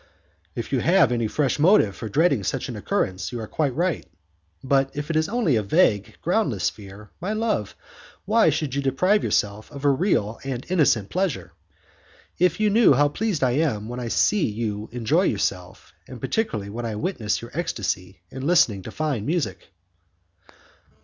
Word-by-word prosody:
"If - - -5
you - - +2
have 175 -3 +4
any 120 -2 0
fresh 140 +5 0
motive 155 - +4
for 110 - -6
dreading 140 - +2
such - - -2
an - - -5
occurrence, 95 0 -2
you 120 - -5
are 110 - -4
quite 140 +2 -1
right, 175 +2 0 0.6
but 135 0 +2
if 145 +2 -3
it - - -2
is 155 +2 +1
only 225 - +1
a - - +1
vague, 105 - +2
groundless - - +1
fear, 100 +1 -13
my 195 +5 -2
love, 215 - -1 0.5
why 220 -2 +4
should 150 -3 -2
you 140 - 0
deprive 185 +10 +2
yourself 105 +1 -1
of 140 -1 -7
a 140 - +5
real 130 - 0
and 130 -2 -4
innocent 140 - +2
pleasure? 185 -4 -2 0.9
If 180 0 +2
you 215 -1 +2
knew 225 -7 +6
how 145 +2 +3
pleased 190 -1 -2
I 125 - +3
am 120 -7 0
when 120 +1 -5
I 120 - -4
see 200 - +2
you 105 -1 -4
enjoy 125 +8 +1
yourself, - - -3
and - - -9
particularly 110 - -2
when 120 +3 -5
I 110 - -4
witness 110 - -2
your 120 +1 -10
ecstacy 105 - -3
in 135 +2 -5
listening 115 - +3
to - - -8
fine 150 -9 -2
music!" 150 - -2
135 Hz, 175 wpm, -24 LUFS, 110-175 Hz, 0.9 s, knew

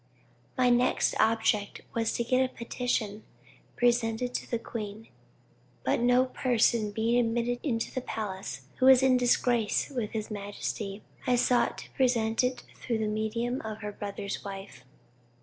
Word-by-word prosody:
"My 250 -1 +4
next 245 +1 +3
object 220 -2 +2
was 225 -1 0
to 235 - 0
get 255 +2 +3
a 255 - -2
petition 230 -3 -2 0.5
presented 240 0 +1
to - - -3
the 235 - 0
queen, 220 -1 -7 0.7
but - - +1
no 245 +2 +4
person 235 -4 +2
being 225 +3 +1
admitted 235 +1 0
into 230 -6 -2
the 255 - -2
palace 195 - -5 0.2
who 260 - +4
was 265 0 +8
in 260 -1 +5
disgrace 245 0 +2
with 240 -6 -3
his 215 -1 -4
majesty, 205 0 -4 0.2
I 250 - +4
sought 245 0 +2
to - - -10
present 235 -3 +2
it 250 -1 -1
through 235 -3 -3
the 220 - -1
medium 220 +4 -1
of 220 0 -6
her 210 -1 -4
brother's 200 -1 -5
wife. 195 -10 -8
230 Hz, 150 wpm, -29 LUFS, 215-245 Hz, 0.7 s, was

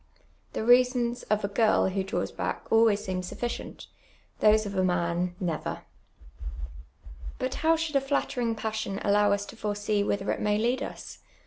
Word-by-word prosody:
The - - -2
rea.sons 245 0 +3
of 210 0 +1
a - - +1
girl 215 +1 +3
who 190 0 -1
(haws 190 - -2
back - - -4
always 225 -2 +4
seem 185 -1 -2
sufficient, 235 +6 -5 0.5
those 215 0 +5
of 200 - -5
a 185 - +2
man 175 0 0
—never. 170 -4 -3 1.6
liut 255 - -2
how 325 +1 +3
should 320 -2 -3
a 275 - +4
flattering; 265 -4 -1
pa.ssion 220 -3 -3
allow 205 0 +3
us 200 0 0
to - - -11
foresee 205 -1 -1
whither 200 -1 -1
it - - -3
may 210 0 +2
lead 240 +4 +1
us? - - -7
210 Hz, 160 wpm, -28 LUFS, 200-240 Hz, 1.6 s, those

